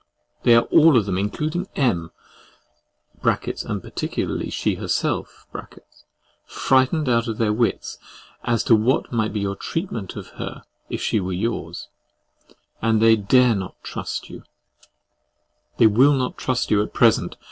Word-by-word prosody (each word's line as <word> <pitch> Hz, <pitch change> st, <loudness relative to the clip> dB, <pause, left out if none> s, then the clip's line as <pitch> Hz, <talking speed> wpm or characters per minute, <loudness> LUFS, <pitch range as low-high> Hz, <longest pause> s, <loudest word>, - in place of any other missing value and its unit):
They 120 Hz, -, +5 dB
are 115 Hz, -, +5 dB
all 155 Hz, -4 st, +6 dB
of 110 Hz, -, +2 dB
them 95 Hz, -2 st, -1 dB
including 155 Hz, -, -2 dB
M—— 90 Hz, -, 0 dB, 1.1 s
(and -, -, -1 dB
particularly -, -, -3 dB
she -, -, -1 dB
herself) -, -, -2 dB, 1.0 s
frightened 135 Hz, +3 st, +1 dB
out 115 Hz, -1 st, +2 dB
of 110 Hz, -2 st, -3 dB
their 110 Hz, -2 st, +1 dB
wits, 115 Hz, +1 st, -1 dB, 0.4 s
as 120 Hz, -2 st, 0 dB
to 115 Hz, -, +5 dB
what 110 Hz, +5 st, +1 dB
might 110 Hz, -2 st, 0 dB
be 105 Hz, -, -3 dB
your 100 Hz, 0 st, -2 dB
treatment 115 Hz, -, -4 dB
of -, -, -8 dB
her -, -, -6 dB, 0.3 s
if -, -, -4 dB
she 110 Hz, -, +1 dB
were 95 Hz, -1 st, -3 dB
yours; 110 Hz, +6 st, -3 dB, 0.9 s
and 115 Hz, -1 st, +2 dB
they 115 Hz, 0 st, +6 dB
dare 120 Hz, +4 st, +4 dB
not 95 Hz, -2 st, -5 dB
trust -, -, -5 dB
you—they -, -, -8 dB
will 125 Hz, +7 st, +5 dB
not 130 Hz, -2 st, -1 dB
trust 130 Hz, -1 st, -2 dB
you, 105 Hz, -1 st, +4 dB
at 105 Hz, -, -5 dB
present. -, -, +3 dB
115 Hz, 140 wpm, -22 LUFS, 105-130 Hz, 1.1 s, all